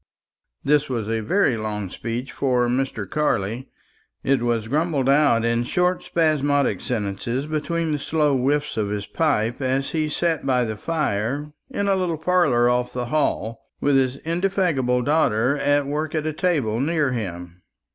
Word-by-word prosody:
This 150 0 +2
was 115 -5 -2
a 115 0 0
very 130 - +2
long 105 -2 -3
speech 120 +3 -4
for 125 -3 +1
Mr. 125 -5 -1
Carley. 115 -3 -1 0.5
It 135 -2 +2
was 120 -2 0
grumbled 150 0 0
out 140 -5 +4
in 115 0 +1
short 180 +8 +1
spasmodic 145 -4 +1
sentences 115 +3 -2
between 155 +2 -1
the 150 - -1
slow 150 -1 +1
whiffs 145 +2 0
of 105 -2 0
his 105 -1 -3
pipe, 125 -6 0
as 135 +1 0
he 155 -2 0
sat 165 0 0
by 130 -2 +2
the 110 -2 -3
fire 145 +1 -2 0.2
in 200 -6 -2
a 195 - +3
little 180 -4 -1
parlour 155 -8 +3
off 125 0 +1
the 125 -1 -3
hall, 115 -6 -1 0.2
with 145 0 +2
his 130 0 +2
indefatigable 165 -8 +1
daughter 140 -3 +2
at 145 0 +2
work 150 +3 -2
at 155 -1 -1
a 155 - -1
table 145 - 0
near 150 0 +1
him. 90 -6 -5
135 Hz, 160 wpm, -23 LUFS, 115-155 Hz, 0.5 s, out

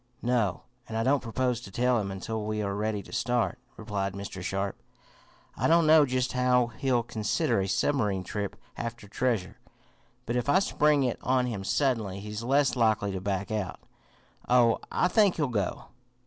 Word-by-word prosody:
"No, 115 -6 0 0.3
and 110 - -3
I 115 - +1
don't 135 +2 +3
propose 125 +1 -1
to 110 - -10
tell 125 +4 +2
him 100 -2 -3
until 105 +3 -4
we 105 0 -2
are 100 -1 -2
ready 105 0 -2
to - - -13
start," 120 -2 0 0.2
replied 100 -3 -3
Mr. 100 -1 -6
Sharp. 95 +2 -3 0.7
"I - - +1
don't 165 0 +5
know 155 -2 +6
just 130 0 -1
how 125 -1 +2
he'll 130 -4 +2
consider 110 -3 0
a 95 - -1
submarine 105 -3 +1
trip 100 0 -4 0.2
after 115 -3 -5
treasure, 110 -3 -1 0.7
but 120 - -2
if 125 +3 -1
I 160 - +5
spring 150 -6 +3
it 125 -2 -1
on 130 -1 +2
him 110 -6 -4
suddenly 110 -5 0
he's 105 +2 -6
less 135 +3 +2
likely 110 -4 +2
to 95 -1 -4
back 100 +2 -2
out. 105 -4 -3 0.7
Oh, 120 -2 +4
I - - +2
think 200 0 +4
he'll 150 -3 0
go." 105 -6 -2
115 Hz, 175 wpm, -28 LUFS, 100-125 Hz, 0.7 s, know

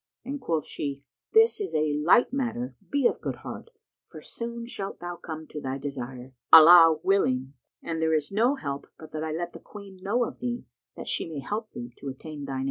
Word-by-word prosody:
and 275 +2 -5
quoth 165 - -1
she, 140 -2 -4 0.3
"This 445 0 +5
is 400 - -3
a 155 -1 +2
light 165 - +4
matter; 135 - -2
be 285 -2 +1
of - - +2
good - - -3
heart, - - -7 0.3
for - - -12
soon 235 0 -6
shalt 200 -5 -5
thou 175 0 -5
come 160 -2 -7
to 150 - -6
thy 135 0 -3
desire, 130 -2 -6 0.2
Allah 165 0 +10
willing; 135 -9 +1 0.3
and 165 -1 -3
there 160 0 +3
is 150 +1 -1
no 235 +7 +3
help 140 - -5
but 155 - -12
that 155 0 -4
I 160 - -3
let 170 +2 -3
the - - -9
Queen 200 -2 -12
know 225 +6 +1
of - - -6
thee, 245 0 -3 0.3
that - - -8
she - - -1
may 160 - -6
help 215 - -4
thee 120 0 -7
to 140 - -5
attain 145 +2 -8
thine 135 -1 -4
aim." - - -2
160 Hz, 215 wpm, -27 LUFS, 140-220 Hz, 0.3 s, Allah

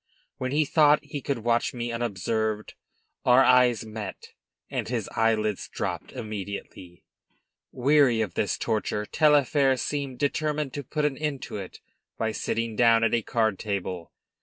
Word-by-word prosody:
When 130 0 -2
he 150 +2 +2
thought 150 0 +4
he 145 -1 -6
could 130 -4 -3
watch 120 +1 +1
me 120 0 -3
unobserved 110 -1 -2 0.5
our 125 +2 +6
eyes 125 -4 +4
met, 110 -3 -8 0.3
and - - -3
his - - -2
eyelids 110 -2 +1
dropped - - -4
immediately. 100 -4 -7 0.7
Weary 135 -2 +3
of 105 -6 -2
this - - -1
torture, 105 -1 -1
Taillefer 145 -1 +3
seemed 140 -1 -3
determined 150 0 -1
to 145 - -4
put 150 +3 -2
an 140 -3 -1
end 150 -3 -2
to - - -6
it 95 -2 -9 0.4
by 110 0 -1
sitting 115 +1 -2
down 115 0 +5
at 115 - +2
a 120 - +3
card 110 -3 0
table. 95 -5 -4
120 Hz, 150 wpm, -26 LUFS, 110-140 Hz, 0.7 s, our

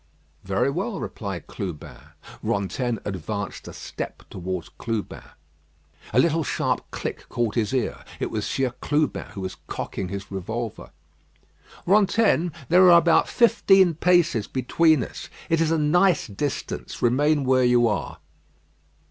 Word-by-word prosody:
"Very 100 +8 0
well," 195 +7 -3
replied 95 -6 -5
Clubin. 90 -6 -6 0.5
Rantaine 115 +5 -1
advanced 100 +1 -5
a - - -7
step - - -7
towards 90 -1 -5
Clubin. 115 -3 -4 0.9
A - - -1
little 165 +3 +3
sharp - - -1
click - - -6
caught 120 -3 -1
his 110 -4 0
ear. 130 -4 -2 0.2
It - - -2
was - - -2
Sieur 130 -2 0
Clubin 150 0 0
who 100 - -6
was 95 0 -5
cocking 95 - -4
his 100 0 -6
revolver. 110 +4 -5 1.0
"Rantaine, 200 -2 +3 0.2
there 180 +4 +6
are 170 - +9
about 170 0 +4
fifteen 195 -6 +4
paces 165 - +2
between 150 +2 +2
us. - - -8 0.2
It 165 0 +3
is 160 - +2
a 165 - +2
nice 170 +3 +3
distance. 135 +7 -4
Remain 145 +5 +3
where 130 0 +3
you 120 -1 +4
are." 105 -8 -2
130 Hz, 135 wpm, -24 LUFS, 105-165 Hz, 1.0 s, are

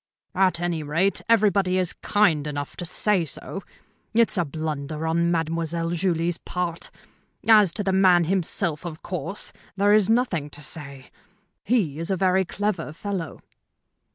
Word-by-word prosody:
"At 185 -2 +2
any 175 -2 -1
rate, 165 +7 +1
everybody 200 -4 +3
is 180 -2 +2
kind 165 -8 +1
enough 145 -1 -5
to 175 - -4
say 195 +1 +1
so. 165 +5 -5 0.5
It's 230 0 +4
a 175 - +2
blunder 155 0 -4
on 170 +1 +1
Mademoiselle 165 0 -1
Julie's 170 -1 0
part. 175 -2 -3 0.6
As 210 -5 +7
to 205 - -2
the 190 -1 0
man 185 -2 +5
himself, 170 -2 0
of 165 -3 -7
course, 180 +2 -4 0.2
there 205 +1 +4
is 210 -2 +4
nothing 225 - +1
to 150 - -7
say. 140 -3 -4 0.5
He 190 - 0
is 165 - 0
a 190 - +1
very 190 +1 +2
clever 190 -3 -2
fellow." 185 -1 -5
175 Hz, 150 wpm, -24 LUFS, 160-195 Hz, 0.6 s, As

